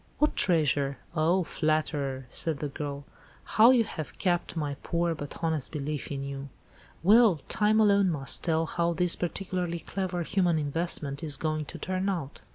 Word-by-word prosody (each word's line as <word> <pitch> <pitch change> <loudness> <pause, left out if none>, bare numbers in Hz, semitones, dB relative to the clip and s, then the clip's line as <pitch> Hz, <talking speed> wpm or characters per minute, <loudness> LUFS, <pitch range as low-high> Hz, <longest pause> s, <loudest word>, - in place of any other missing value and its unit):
"What 300 - +2
treasure? 145 -5 +2 0.2
Oh, 170 +4 +2
flatterer!" 150 -5 -1
said 160 -3 0
the 145 +1 -4
girl; 140 0 -5 0.4
"how 225 +2 +5
you 250 -3 +5
have 160 -8 -7
capped 175 -3 0
my 145 -2 -2
poor 170 0 0
but 145 +1 -8
honest 160 -4 0
belief 150 -1 -4
in 140 -1 -3
you. 140 0 -6 0.5
Well, 210 -3 +6
time 215 +1 +2
alone 200 -3 +4
must 135 -6 -1
tell 165 -1 +1
how 170 +1 0
this 175 +1 +2
particularly 180 -1 -3
clever 180 0 -3
human 175 -1 +1
investment 150 -1 -2
is 150 -3 -4
going 155 -1 -2
to - - -8
turn 185 +1 -2
out. 165 -8 -4
165 Hz, 165 wpm, -28 LUFS, 145-180 Hz, 0.5 s, Well